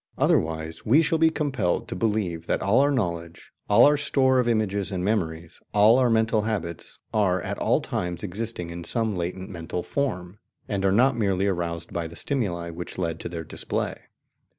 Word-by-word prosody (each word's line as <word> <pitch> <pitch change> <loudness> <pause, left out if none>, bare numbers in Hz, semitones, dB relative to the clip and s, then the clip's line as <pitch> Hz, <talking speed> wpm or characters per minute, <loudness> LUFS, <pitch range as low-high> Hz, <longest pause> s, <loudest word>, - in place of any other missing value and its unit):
Otherwise 80 - 0
we 130 +8 +5
shall 165 0 +1
be 160 0 +5
compelled 135 - -1
to - - -5
believe 90 -5 -1
that - - 0
all 100 +6 +4
our 140 +1 +4
knowledge, 85 - -3 0.2
all 105 +3 +7
our 145 +1 +5
store 130 -2 +2
of 125 - +1
images 105 -4 0
and 90 -1 -2
memories, 85 -6 -2 0.2
all 110 +4 +6
our 125 -2 +3
mental 110 -1 +2
habits, 95 -7 -4 0.2
are 95 -4 +2
at - - -4
all - - +2
times 90 +1 -3
existing 100 -3 -3
in 85 0 -6
some 110 +1 0
latent 90 +2 -4
mental 85 0 -4
form, 100 -9 -3 0.3
and 100 -2 -2
are 95 - +4
not 125 +6 +4
merely 100 -4 +1
aroused 85 -3 -2
by 85 -1 -2
the 85 - -12
stimuli 90 - -2
which 85 +1 -7
lead 85 -3 -2
to - - -5
their 85 -1 -5
display. - - -3
100 Hz, 185 wpm, -25 LUFS, 85-115 Hz, 0.3 s, all